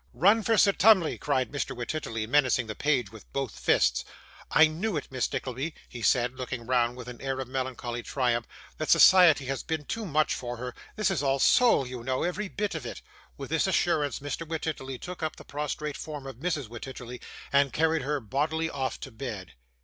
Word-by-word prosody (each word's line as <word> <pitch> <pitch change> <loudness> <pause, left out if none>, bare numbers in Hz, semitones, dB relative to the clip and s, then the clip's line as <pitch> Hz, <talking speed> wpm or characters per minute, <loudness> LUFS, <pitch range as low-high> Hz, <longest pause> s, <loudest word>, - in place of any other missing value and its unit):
'Run 200 - +5
for 225 +1 +2
Sir 200 - +6
Tumley,' 195 -5 +4
cried 135 -3 0
Mr. 145 - -3
Wititterly, 120 -3 -3
menacing 130 -1 +3
the 110 - -5
page 130 -6 0
with 110 -3 -14
both 135 -4 -3
fists. 60 0 +3 0.5
'I 160 - +7
knew 165 +5 -2
it, 145 - -3
Miss 130 -2 -1
Nickleby,' 135 +5 -3
he 120 - -9
said, 120 +1 +2
looking 130 -2 -5
round 120 0 +1
with 125 -1 -8
an 125 -1 -9
air 135 -1 -2
of 135 - -4
melancholy 130 -2 -3
triumph, 120 -2 0 0.3
'that - - -3
society 175 -7 +7
has 135 +1 -2
been 160 -2 -3
too 225 +8 -3
much 155 -5 +1
for 120 -1 -5
her. 125 +1 -5 0.2
This 215 -3 +1
is 165 -8 0
all 135 -1 +2
soul, 235 - +5
you 125 -1 -6
know, 130 +1 -1
every 180 +4 -2
bit 205 +1 -3
of - - -4
it.' - - -7 0.3
With - - -7
this - - +2
assurance 150 -6 +1
Mr. 145 +3 -4
Wititterly 155 -5 -4
took 180 -1 -7
up 155 -1 -2
the - - -13
prostrate 150 0 -4
form 150 -3 -7
of 135 -3 -8
Mrs. 150 -3 -2
Wititterly, 125 +1 -8 0.3
and 140 -1 +4
carried 160 0 +2
her 145 +2 -1
bodily 150 +7 -1
off 135 -2 -3
to 135 - -7
bed. 110 -5 -6
135 Hz, 200 wpm, -28 LUFS, 125-160 Hz, 0.5 s, I